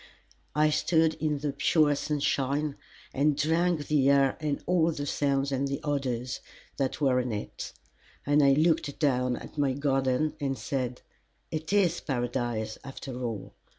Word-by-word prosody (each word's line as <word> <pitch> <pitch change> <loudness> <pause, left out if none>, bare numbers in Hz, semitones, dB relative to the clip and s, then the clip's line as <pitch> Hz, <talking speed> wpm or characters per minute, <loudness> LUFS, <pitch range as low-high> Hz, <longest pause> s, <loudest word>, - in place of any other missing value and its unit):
I 150 0 +4
stood 160 +1 +3
in 155 -2 0
the 145 0 -2
pure 150 0 +3
sunshine 145 0 0 0.4
and 145 +1 +2
drank 160 +1 +1
the 140 -2 +3
air 140 -1 +4
and 150 -2 -1
all 170 -2 +3
the 145 -2 -4
sounds 140 -1 0
and 135 +1 0
the 140 0 -2
odors 130 -4 -2 0.4
that 135 -2 -1
were 130 -4 +3
in 125 -1 -2
it; 105 -1 -5 0.5
and 145 +1 +4
I 140 0 +6
looked 160 0 +2
down 125 -4 +1
at 150 - -9
my 140 -2 +2
garden 135 +1 +1
and 135 -2 -1
said: 125 +2 -3 0.5
"It 160 +2 -4
is 200 -4 +3
Paradise, 120 -4 -2
after 135 -2 -7
all." 115 -5 -4
140 Hz, 150 wpm, -28 LUFS, 130-150 Hz, 0.5 s, I